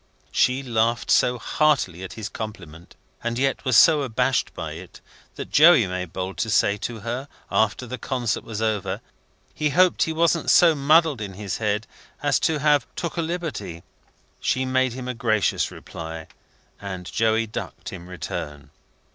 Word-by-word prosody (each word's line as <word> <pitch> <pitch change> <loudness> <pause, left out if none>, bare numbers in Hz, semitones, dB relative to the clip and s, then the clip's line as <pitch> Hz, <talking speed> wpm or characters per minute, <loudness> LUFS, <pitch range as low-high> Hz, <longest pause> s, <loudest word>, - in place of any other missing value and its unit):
She 130 +2 +2
laughed 115 -1 0
so 125 0 +4
heartily 120 - +1
at 95 - -7
his 110 -2 -5
compliment, 90 -8 -9 0.3
and 120 0 -2
yet 135 +1 0
was 130 -3 +3
so 155 +2 +7
abashed 130 0 0
by 80 -3 -5
it, 85 +4 -10 0.4
that - - -7
Joey 155 -6 +7
made 90 -2 -4
bold 95 +2 -5
to 110 - -1
say 100 -2 +3
to 110 +1 -5
her, 120 +5 -4 0.2
after 110 +3 +1
the 125 +1 -6
concert 120 -2 -2
was 110 -1 -4
over, 110 -3 -1 0.5
he 150 -1 0
hoped 180 +4 +3
he 160 - +2
wasn't 165 +1 +1
so 170 -2 +6
muddled 150 -2 +3
in 100 -2 -5
his 100 -1 -4
head 105 -1 -1 0.4
as - - +2
to 160 - +1
have 145 -1 +2
took 170 - -4
a 170 - 0
liberty? 160 - -4 0.6
She 130 0 0
made 130 -1 +1
him 125 0 -6
a 125 - -2
gracious 110 -3 +1
reply, 80 -1 -8 0.6
and 95 -3 -6
Joey 110 +3 +1
ducked 110 - -7
in 90 -1 -9
return. 75 -4 -6
115 Hz, 165 wpm, -23 LUFS, 95-140 Hz, 0.6 s, so